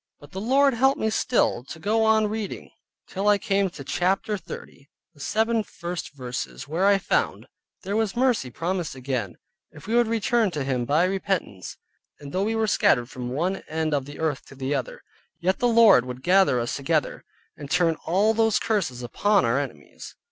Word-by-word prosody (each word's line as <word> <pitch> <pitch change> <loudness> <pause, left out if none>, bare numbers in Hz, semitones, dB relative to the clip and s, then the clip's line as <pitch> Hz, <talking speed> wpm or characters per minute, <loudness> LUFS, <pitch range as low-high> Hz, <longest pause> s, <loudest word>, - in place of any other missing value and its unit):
But 145 - -15
the 190 - -5
Lord 270 +4 +3
helped 265 +4 +2
me 220 - 0
still 220 - +1
to 155 - -9
go 220 +5 +1
on 220 0 +4
reading 210 -1 -5 0.3
till 195 +2 -3
I 205 0 +5
came 195 0 0
to 165 -6 -10
Chap. 185 +7 0
30, 190 -8 -7 0.2
the 145 - -22
seven 225 +8 +1
first 175 -6 -7
verses, 125 0 -6
where 170 +6 +1
I 200 0 +5
found, 195 - -1 0.4
there 200 +2 -3
was 220 -1 0
mercy 240 - +1
promised 170 +3 -3
again, 125 -7 -4 0.3
if - - -14
we 220 - -3
would 240 -1 +4
return 230 0 +1
to 145 - -1
Him 130 -3 -1
by 150 +6 +2
repentance; 185 - -2 0.4
and 140 -1 -9
though 190 - 0
we 225 +1 -1
were 225 0 +1
scattered 120 - +2
from 125 -1 -5
one 175 +9 -1
end 155 0 -1
of 140 -2 0
the 145 +1 -10
earth 155 -4 -2
to - - -13
the 135 +1 -2
other, 135 -4 -4 0.4
yet 185 +2 0
the 245 - +2
Lord 225 - +6
would 125 +1 -7
gather 185 -7 +4
us 120 0 -2
together, 150 +2 -1 0.3
and 145 - -9
turn 170 0 +3
all 200 +6 +3
those 225 -1 +2
curses 165 - -1
upon 200 - +2
our 115 +4 +2
enemies. 125 - -8
185 Hz, 190 wpm, -25 LUFS, 140-215 Hz, 0.4 s, Lord